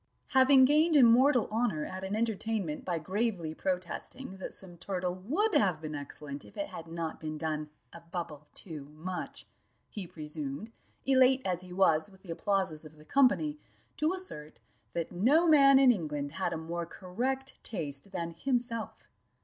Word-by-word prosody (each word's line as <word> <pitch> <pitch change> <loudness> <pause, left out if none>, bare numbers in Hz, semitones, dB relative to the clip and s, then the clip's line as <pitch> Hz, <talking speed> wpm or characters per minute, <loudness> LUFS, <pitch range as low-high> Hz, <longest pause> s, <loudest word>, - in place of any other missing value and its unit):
Having 265 -1 +7
gained 305 +4 +4
immortal 250 0 +6
honour 215 -9 0
at 185 0 -6
an 190 +2 -2
entertainment 220 -6 -1
by 175 -2 -1
gravely 185 -1 -1
protesting 190 +6 -4
that 190 - -6
some 180 -2 -9
turtle 180 0 -2
would 305 - 0
have 185 -6 +3
been 155 -1 -6
excellent 145 0 -6
if - - -16
it 300 0 -3
had 165 - -8
not 165 -1 -4
been 155 -1 -5
done 155 -1 -3 0.2
a 170 - -10
bubble 165 -3 -6
too 155 -6 -6
much, 180 +3 -6 0.5
he 200 -4 -4
presumed, 150 +5 -6 0.3
elate 260 0 +5
as 180 -1 -1
he 180 -1 -12
was 180 -2 +3
with 190 -1 -20
the 180 - -7
applauses 185 -3 0
of 155 0 -12
the 150 0 -17
company, 280 - +3 0.4
to 310 +2 +2
assert, 365 - -6 0.4
that 170 -1 -2
no 275 - +4
man 275 -3 +7
in 265 -2 +7
England 150 -8 -2
had 175 +2 -2
a 165 - -2
more 170 +1 -4
correct 255 +10 -3
taste 155 -3 -2
than 170 -3 -3
himself. 235 +4 -2
185 Hz, 165 wpm, -31 LUFS, 160-250 Hz, 0.5 s, Having